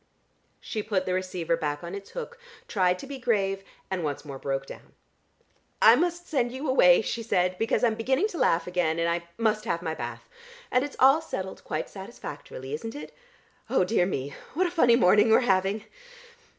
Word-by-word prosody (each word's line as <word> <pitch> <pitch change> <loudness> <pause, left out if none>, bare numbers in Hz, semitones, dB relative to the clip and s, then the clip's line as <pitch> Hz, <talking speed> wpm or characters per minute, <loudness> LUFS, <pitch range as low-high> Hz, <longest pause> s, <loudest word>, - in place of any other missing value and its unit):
She 215 - -4
put 205 -3 -1
the 185 - -1
receiver 185 -3 -1
back 150 -1 -3
on 170 +1 -6
its 200 0 -7
hook, 480 -1 -7 0.3
tried 180 -3 +2
to - - -9
be 275 -1 -7
grave 195 -6 0 0.3
and 185 -3 -1
once 145 0 -3
more 140 -2 -7
broke 135 0 -2
down. - - -12 0.9
"I - - +8
must 350 0 -1
send 250 -6 0
you 265 +4 -5
away," 180 -8 +6
she 235 - -3
said, 185 -5 +1
"because 225 +2 +1
I'm 235 -2 +4
beginning 265 - +1
to 350 - -6
laugh 165 0 +2
again, 175 -3 0
and 170 0 +1
I 170 0 -1
must 215 -1 +1
have 170 -5 -2
my 160 -2 -2
bath. - - -7 0.4
And 250 +1 +3
it's 285 - -6
all 270 +5 +6
settled 190 -12 -6
quite 155 -1 -3
satisfactorily, 150 - -8
isn't 225 - -5
it? 295 - -8 0.6
Oh, - - +3
dear 180 -2 +2
me, 140 -5 -3 0.2
what 370 +4 +2
a 350 - -1
funny 250 -9 +5
morning 210 0 +5
we 220 - +7
are - - +6
having." 195 -1 +1
195 Hz, 195 wpm, -27 LUFS, 175-245 Hz, 0.9 s, I